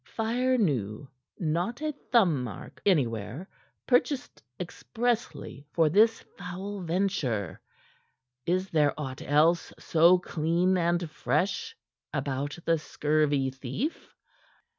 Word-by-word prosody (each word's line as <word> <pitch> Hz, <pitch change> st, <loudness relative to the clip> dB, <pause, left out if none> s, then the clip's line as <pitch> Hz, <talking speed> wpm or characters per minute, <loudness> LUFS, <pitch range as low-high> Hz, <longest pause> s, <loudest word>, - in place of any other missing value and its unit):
"Fire 245 Hz, +3 st, +1 dB
new; 135 Hz, -, 0 dB, 0.3 s
not 175 Hz, -, -1 dB
a 305 Hz, 0 st, -2 dB, 0.2 s
thumbmark 145 Hz, -, +1 dB
anywhere; 125 Hz, -, 0 dB, 0.4 s
purchased 255 Hz, +1 st, +1 dB, 0.2 s
expressly 225 Hz, -, -3 dB
for 165 Hz, -2 st, +4 dB
this 220 Hz, +7 st, +4 dB, 0.2 s
foul 190 Hz, +3 st, -5 dB
venture. 165 Hz, -, -1 dB, 0.9 s
Is 185 Hz, +2 st, 0 dB
there 150 Hz, -2 st, +2 dB
aught 130 Hz, -3 st, -5 dB
else 155 Hz, +4 st, +3 dB
so 170 Hz, +3 st, +5 dB
clean 175 Hz, +2 st, +1 dB
and 175 Hz, -1 st, +1 dB
fresh 155 Hz, +6 st, -1 dB, 0.4 s
about 140 Hz, +1 st, -2 dB
the 165 Hz, -1 st, +3 dB
scurvy 145 Hz, -3 st, +1 dB
thief?" 135 Hz, -, -5 dB
170 Hz, 95 wpm, -28 LUFS, 145-195 Hz, 0.9 s, so